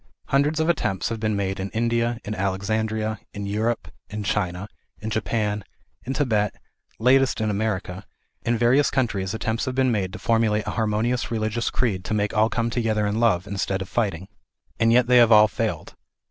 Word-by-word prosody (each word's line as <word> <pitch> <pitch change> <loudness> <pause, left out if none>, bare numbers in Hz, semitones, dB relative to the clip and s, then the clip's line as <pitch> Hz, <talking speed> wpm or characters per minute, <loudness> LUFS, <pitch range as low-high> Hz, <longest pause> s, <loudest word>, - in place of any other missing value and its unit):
Hundreds 145 +3 +2
of 160 - +1
attempts 95 - 0
have 115 -1 -4
been 110 -2 0
in 95 0 -2
India, 115 +1 +1
in 105 - -3
Alexandria, 110 +2 -1 0.2
in 100 0 -4
Europe, 110 +4 -1 0.2
in 105 0 -5
China, 95 -1 -1 0.3
in 110 +1 -5
Japan, 105 -1 -1 0.4
in 130 - -4
Tibet, 110 -8 0 0.4
latest 130 +2 +3
in 110 -1 0
America, 100 -2 -2 0.4
in 120 0 0
various 125 +5 +4
countries 100 -6 -1
attempts 110 +1 -2
have 130 - -3
been 130 -1 +2
made 95 -5 -1
to - - -5
formulate 110 -2 +1
a - - -2
harmonious 115 +2 0
religious 110 0 -1
creed 100 -7 -1
to 110 - -1
make 105 0 0
all 110 +1 +4
come 115 0 -1
together 110 -3 0
in 105 +2 -1
love, 100 -6 +2
instead 100 -1 -2
of 95 - -5
fighting. 95 -6 -1 0.5
And 115 0 +4
yet 125 +1 +5
they 125 0 +5
have 120 -1 +6
all 105 0 +8
failed. - - -3
110 Hz, 180 wpm, -24 LUFS, 105-120 Hz, 0.5 s, all